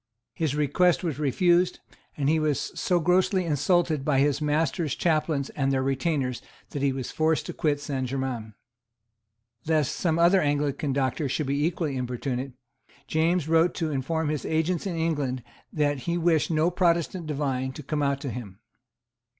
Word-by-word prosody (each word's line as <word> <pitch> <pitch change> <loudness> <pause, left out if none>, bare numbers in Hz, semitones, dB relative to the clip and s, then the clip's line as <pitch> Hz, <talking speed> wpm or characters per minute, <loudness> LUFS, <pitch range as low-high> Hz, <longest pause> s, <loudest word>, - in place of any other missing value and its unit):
His 155 -4 -1
request 165 +5 +2
was 160 -5 -2
refused; 175 +5 +2 0.4
and 140 -2 0
he 160 +2 +3
was 150 -2 -1
so 180 -2 +1
grossly 180 +2 +2
insulted 160 0 +1
by 140 -1 +1
his 145 +2 +2
master's 150 0 0
chaplains 155 -4 0
and 135 -1 0
their 130 -1 +1
retainers 135 -2 -1 0.3
that 145 - -4
he 140 -1 +2
was 130 -2 -4
forced 160 0 +1
to - - -5
quit 145 -2 0
Saint 135 -3 -3
Germains. 125 -5 -4 1.1
Lest 155 -4 +2
some 165 -3 0
other 175 +3 +5
Anglican 145 -1 0
doctor 135 +1 0
should 150 - -1
be 140 +2 0
equally 160 -4 -1
importunate, 125 +1 -3 0.5
James 160 +2 +1
wrote 165 +2 +3
to 160 -2 -2
inform 150 +3 -1
his 150 -2 -2
agents 160 +3 0
in 180 - -3
England 145 -6 -1 0.3
that 145 -2 0
he 170 +6 -2
wished 165 -2 +2
no 160 +1 +2
Protestant 170 -1 +1
divine 135 -3 -1
to 150 - -8
come 150 +2 -2
out 140 -1 +1
to 135 - -4
him. 105 -7 -7
150 Hz, 165 wpm, -26 LUFS, 135-165 Hz, 1.1 s, other